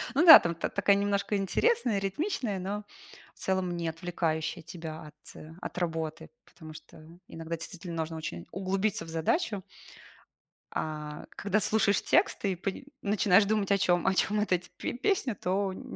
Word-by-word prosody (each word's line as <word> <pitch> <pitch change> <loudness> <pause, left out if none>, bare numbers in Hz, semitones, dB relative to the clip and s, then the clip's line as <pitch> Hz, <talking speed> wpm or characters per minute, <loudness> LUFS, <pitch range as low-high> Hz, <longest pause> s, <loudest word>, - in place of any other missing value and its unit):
Ну 330 - +4
да, 320 - +13
там 170 -1 -2
та 165 - -2
такая 200 0 +3
немножко 200 +1 0
интересная, 235 - +1
ритмичная, 205 - -2
но 205 +3 -4 0.5
в - - -22
целом 185 -2 -1
не 170 -1 -3
отвлекающая 165 0 -2
тебя 160 -1 -8
от 150 - -15 0.5
от - - -7
работы. 160 -4 -3 0.2
Потому 155 -2 -12
что 155 - -14 0.3
иногда 165 0 -5
действительно 170 +1 -7
нужно 160 0 -3
очень 85 - -6
углубиться 195 +3 -1
в 165 - -11
задачу. 195 - -1 1.1
А, 150 -1 -5
когда 205 +2 0
слушаешь 210 -2 +2
текст - - +2
и 190 - +1
пани 195 +8 -5 0.2
начинаешь 200 -1 +4
думать, 205 -1 0
о 200 - +5
чём 175 -3 +2
о 190 - +3
чём 210 +2 +1
вот 210 -2 -1
эти 180 0 0
пе - - -3
песня, 265 - 0
то 190 +1 -1
н - - -9
190 Hz, 165 wpm, -29 LUFS, 165-205 Hz, 1.1 s, да